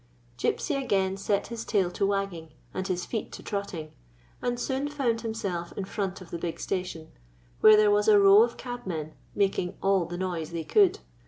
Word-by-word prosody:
Gypsy 275 - 0
again 190 -5 +1
set 195 +1 0
his 230 -1 -5
tail 190 -5 +1
to 195 +2 0
wagging 195 -6 -2 0.2
and 190 - -3
his 180 -2 -2
feet 220 -3 -4
to - - -9
trotting, 190 -6 -4 0.5
and 245 0 -1
soon 265 +3 -1
found 250 -6 0
himself 195 -7 -4
in 195 - -2
front 195 -1 -3
of 185 - -12
the 170 - -4
big 165 -1 -4
station, 180 -4 -4 0.5
where 215 0 +8
there 210 -1 +5
was 205 0 +2
a 215 -1 +7
row 200 +1 +8
of 235 +1 +1
cab 245 -4 -7
men 155 -3 -4 0.2
making 195 -3 0
all 195 -3 +2
the 175 +1 -6
noise 175 -4 -3
they 170 -1 -4
could. 190 - +3
195 Hz, 190 wpm, -27 LUFS, 175-215 Hz, 0.5 s, where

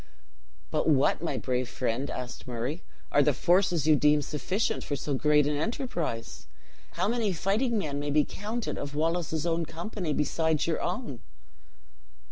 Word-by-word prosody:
"But - - +1
what, 140 -1 +3
my 170 - -1
brave 125 -1 -1
friend," 130 +3 -2
asked 125 0 -6
Murray, 125 +7 -3 0.3
"are 145 - +5
the 145 -1 +3
forces 175 -2 +3
you 155 -1 +6
deem 150 0 +4
sufficient 170 - -1
for 145 - -2
so 140 +1 -3
great 150 +1 +4
an 150 0 +1
enterprise? 160 - -3 0.5
How - - 0
many 225 -2 +1
fighting 220 +7 +1
men 145 -7 -2
may 145 0 -2
be 150 0 +3
counted 220 +4 -4
of 140 0 -5
Wallace's 160 0 0
own 170 0 +1
company, 170 +2 -4
besides 155 +1 +1
your 165 - 0
own?" 180 - -3
155 Hz, 155 wpm, -28 LUFS, 145-180 Hz, 0.5 s, you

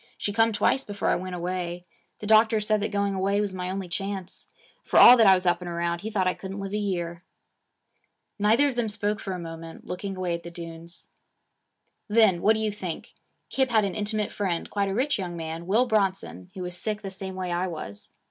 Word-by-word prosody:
She 205 - -2
come 225 +1 +4
twice 265 +5 +2
before 205 -4 -2
I - - +3
went 185 0 -4
away. 175 0 -3 0.4
The - - -5
doctor 220 +1 +5
said 215 0 +1
that 210 - -1
going 200 -1 0
away 195 +1 +1
was 205 -2 -1
my 180 -1 -4
only 190 0 -4
chance. 195 0 -4 0.4
For - - 0
all 250 - +11
that 225 -4 +5
I 190 - +8
was 185 0 -1
up 175 0 +2
and 175 - -5
around, 170 0 -2
he 220 - -4
thought 200 -4 0
I 185 - +2
couldn't 195 +1 -7
live 195 0 -5
a - - +1
year.' 175 -4 -3 1.2
Neither 220 +8 +4
of 275 - -1
them 240 -2 -1
spoke 210 0 -1
for 195 - -4
a - - -4
moment, 165 -1 -9
looking 190 +2 -5
away 180 -2 -1
at 170 - -3
the 170 - -8
dunes. 170 0 -9 1.0
'Then 210 -5 +4
what 215 - +5
do 220 - -2
you 215 -1 0
think 185 -5 -6 0.4
Kip 265 -1 +1
had 220 -3 +3
an 195 - -2
intimate 210 0 -2
friend, 185 -5 -2
quite 200 -1 0
a - - -2
rich 265 +1 +1
young 175 -2 -4
man, 165 +1 -5
Will 220 +6 +3
Bronson, 195 - -1
who 185 - -5
was 180 0 -5
sick 210 +3 -3
the 195 - -5
same 190 0 -6
way 185 -1 -3
I 175 +2 0
was. 130 - -7
195 Hz, 225 wpm, -26 LUFS, 175-210 Hz, 1.2 s, all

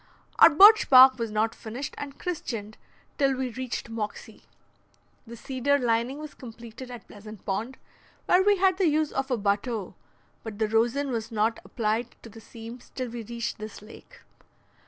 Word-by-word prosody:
Our - - +10
birch 410 +8 +7
bark 260 -1 +8
was 230 -1 -2
not 215 +1 0
finished 240 +5 -7
and 280 -1 -8
christened 230 - -5 0.4
till 275 -1 +2
we 255 -1 -3
reached 255 0 -5
Moxie. 215 -2 -6 0.8
The 235 +1 -10
cedar 265 +4 0
lining 240 +1 0
was 305 0 -8
completed 235 0 -11
at 240 -4 -10
Pleasant 215 0 -12
Pond, 220 +7 -3 0.5
where 360 - +4
we 405 +1 +3
had 375 0 +2
the 375 - +3
use 305 0 +1
of 270 0 -3
a 250 - 0
bateau, 205 0 -2 0.5
but 220 -2 -8
the 220 0 0
rosin 240 +6 +1
was 225 -2 -4
not 220 +1 0
applied 225 +1 -2
to 230 - -10
the 225 - -13
seams 230 +3 -11
till 255 -2 -3
we 235 0 -6
reached 235 +1 -5
this 215 -1 -9
lake. 215 - -15
235 Hz, 170 wpm, -26 LUFS, 220-270 Hz, 0.8 s, Our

